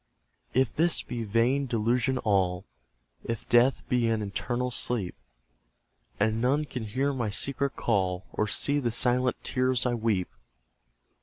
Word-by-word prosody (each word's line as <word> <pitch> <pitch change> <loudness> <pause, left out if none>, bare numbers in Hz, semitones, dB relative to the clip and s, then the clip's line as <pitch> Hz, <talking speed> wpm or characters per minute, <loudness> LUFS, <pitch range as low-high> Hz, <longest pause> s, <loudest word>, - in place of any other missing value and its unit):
If 130 -3 +2
this 165 +1 +2
be 120 -1 -4
vain 120 +6 +1
delusion 120 +2 +1
all, 95 -3 +1 0.6
If 115 -2 -5
death 120 +3 +3
be 120 -2 +1
an 110 -1 0
eternal 120 +5 -2
sleep, 115 -7 -1 1.1
And 110 +2 +1
none 140 +5 +2
can 125 -5 -5
hear 135 +6 -1
my 120 -5 -2
secret 140 +5 -2
call, 95 -4 0
Or 105 - 0
see 145 +6 +1
the 120 -4 0
silent 125 +2 +1
tears 130 -1 +1
I 125 - +1
weep! 110 -6 0
120 Hz, 140 wpm, -28 LUFS, 110-130 Hz, 1.1 s, death